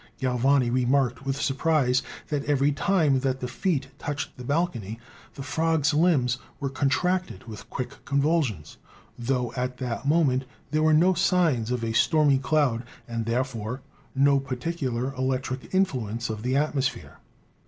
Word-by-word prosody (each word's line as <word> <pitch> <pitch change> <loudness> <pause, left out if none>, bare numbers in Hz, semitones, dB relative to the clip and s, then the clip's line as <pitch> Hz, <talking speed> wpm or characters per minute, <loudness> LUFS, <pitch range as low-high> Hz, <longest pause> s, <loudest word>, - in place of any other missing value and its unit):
Galvani 130 0 +2
remarked 125 0 +1
with 135 +1 -1
surprise 140 -2 +2 0.3
that 145 -2 -1
every 145 0 +2
time 150 -3 +2
that 130 0 -1
the 125 - -3
feet 135 0 -1
touched 145 0 -4
the 125 - -9
balcony 125 - -2 0.4
the 135 - -6
frogs' 160 0 +1
limbs 145 -7 +2 0.2
were 140 -1 -2
contracted 180 +6 0
with 110 -4 -10
quick 125 -2 -6
con 140 0 0
vulsions, 140 - 0 0.4
tho 125 -1 -1
at 125 0 -2
that 125 +1 -4
moment 140 -5 +3 0.3
there 155 0 +1
were 155 0 +4
no 170 +5 +5
signs 165 - +2
of 125 -2 -1
a 115 -1 -1
stormy 145 +2 +4
cloud, 140 -5 +1 0.3
and, 115 -1 -3
therefore, 120 0 -2 0.3
no 140 +1 +4
particular 130 -1 -3
electric 130 0 -2
influ 140 - 0
ence 115 +1 -3
of 110 -1 -5
the 125 +3 0
atmosphere." 140 -2 -1
135 Hz, 150 wpm, -26 LUFS, 125-150 Hz, 0.4 s, no